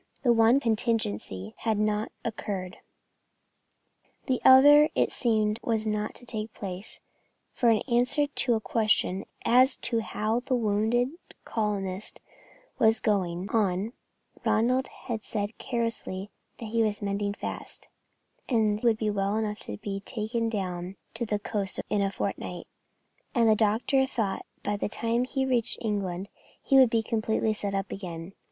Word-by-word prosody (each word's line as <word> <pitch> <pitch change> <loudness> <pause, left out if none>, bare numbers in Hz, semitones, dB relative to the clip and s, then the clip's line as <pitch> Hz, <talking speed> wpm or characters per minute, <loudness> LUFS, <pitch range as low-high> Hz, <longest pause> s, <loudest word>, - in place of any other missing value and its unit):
The 240 -3 +5
one 230 +3 +5
contingency 215 - -1
had 220 -2 0
not 210 +1 0
occurred. 195 -5 -4 1.5
The 255 -3 0
other 290 +3 +8
it - - +2
seemed 215 -2 +1
was 225 -2 0
not 210 0 -2
to 245 - -10
take 215 -2 -5
place, 190 0 +1 0.5
for 240 - +2
in 220 -2 +3
answer 250 +4 +2
to 270 -4 +2
a - - 0
question 215 -3 +1 0.2
as 255 +3 +5
to 230 - +1
how 220 +1 -1
the 255 +1 -1
wounded 225 +2 +1 0.4
colonist 205 -3 -2 0.6
was 220 0 +5
going 185 -4 0
on, 205 0 0 0.5
Ronald 250 +4 +2
had 225 -4 -6
said 210 0 -2
carelessly 230 -5 -3 0.3
that 225 -3 -7
he 230 +1 +1
was 210 -1 0
mending 200 0 -1
fast, - - -6 0.6
and 215 -4 +2
would 230 -3 +3
be 215 -1 0
well 200 0 0
enough 215 -1 -2
to 105 - -7
be 195 - -4
taken 225 +2 -2
down 185 -3 -4 0.2
to 235 - -3
the 210 - 0
coast 205 -1 -2
in 205 - +2
a 195 - +1
fortnight, 195 - -4 0.7
and 235 -2 +4
that 220 - +6
the - - +5
doctor 225 +5 +2
thought 215 -7 -2 0.2
by 205 - -1
the 200 - -2
time 230 +3 0
he 265 +1 -1
reached 240 -3 +1
England 195 -4 -2 0.3
he 275 - +1
would 260 -3 +7
be 225 -1 +1
completely 220 0 0
set 200 -2 -3
up 195 0 -2
again. 175 -1 -7
215 Hz, 150 wpm, -27 LUFS, 200-235 Hz, 1.5 s, other